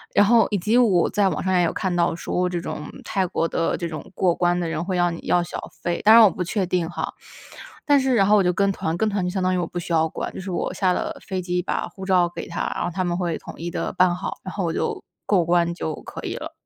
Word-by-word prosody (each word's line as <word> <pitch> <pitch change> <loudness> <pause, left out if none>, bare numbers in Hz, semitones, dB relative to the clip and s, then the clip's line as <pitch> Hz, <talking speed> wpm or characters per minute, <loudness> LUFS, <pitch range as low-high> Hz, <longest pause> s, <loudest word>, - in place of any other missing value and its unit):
然 205 - +6
后 225 0 +5
以 205 - 0
及 210 +6 +1
我 205 -8 +4
在 205 -1 +2
网 - - -3
上 190 - 0
也 175 - +4
有 165 - -1
看 190 -2 -1
到 170 -1 +1
说 180 +1 -1
这 175 -1 -2
种 150 -2 -6
泰 195 -4 -1
国 165 - -1
的 165 - 0
这 175 - -4
种 160 +1 -8
过 180 -2 +2
关 175 +1 +1
的 175 -1 -1
人 160 - -2
会 185 +1 -2
要 175 0 +2
你 165 - -6
要 175 - +2
小 175 - -6 0.2
费， 175 0 -1
当 220 +1 +9
然 230 - +9
我 210 - +7
不 180 - -6
确 190 +2 -1
定 175 -2 -1
哈。 175 - -4 0.7
但 290 -1 +5
是 265 -1 +1
然 200 -4 +4
后 210 +2 +5
我 200 - +4
就 180 - +3
跟 200 +2 +2
团， 160 -4 -2
跟 220 +4 +1
团 200 -2 -1
就 180 - 0
相 185 0 -2
当 185 0 +2
于 - - +1
我 175 - -1
不 - - -7
需 175 0 -5
要 160 0 +3
管， - - -5
就 - - -7
是 190 - -7
我 175 - -2
下 185 -2 +1
了 - - -3
飞 190 -2 -2
机 180 0 -1
把 180 - -2
护 190 -1 -9
照 180 -2 +3
给 - - -6
他， 170 - -3
然 - - -2
后 - - -1
他 185 - -1
们 175 -1 -1
会 175 -3 -1
统 - - -10
一 170 +1 -4
地 170 - -3
办 180 -1 +4
好， 180 - -5
然 185 - -7
后 200 - -2
我 170 - 0
就 - - -2 0.2
过 190 -4 +3
关 170 0 +2
就 160 -2 -4
可 - - -8
以 - - -3
了。 - - -6
180 Hz, 315 characters per minute, -23 LUFS, 175-195 Hz, 0.7 s, 当